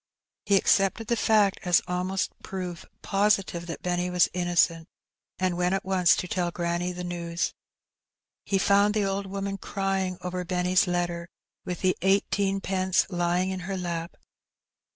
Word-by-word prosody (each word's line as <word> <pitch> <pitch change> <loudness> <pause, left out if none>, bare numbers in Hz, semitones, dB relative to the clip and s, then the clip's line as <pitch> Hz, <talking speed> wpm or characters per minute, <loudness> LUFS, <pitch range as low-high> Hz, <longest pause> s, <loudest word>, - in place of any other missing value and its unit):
He 200 - +4
accepted 195 +3 +3
the 235 - +3
fact 210 -2 +3
as 175 -1 +4
almost 180 +2 -1
proof 180 -3 -6 0.2
positive 195 -4 +1
that 165 - -6
Benny 180 0 0
was 180 -1 +3
innocent^ 175 -2 +2 0.5
and 185 -1 0
went 180 +1 +1
at 195 - -3
once 185 -2 +4
to 180 - -3
tell 180 -3 -1
granny 175 +1 -2
the 180 0 -6
news. 170 -1 -3 0.9
He 195 - 0
found 200 +2 +3
the 210 -2 +2
old 195 0 -2
woman 195 0 -4
crying 195 -2 -2
over 180 0 -3
Benny^s 180 +2 +2
letter, 175 -1 -2 0.4
with 180 -2 -4
the 185 -1 +2
eighteenpence 195 0 +1
lying 175 +1 0
in 190 - -3
her 195 - -2
lap. 170 -1 -4
185 Hz, 150 wpm, -27 LUFS, 175-195 Hz, 0.9 s, He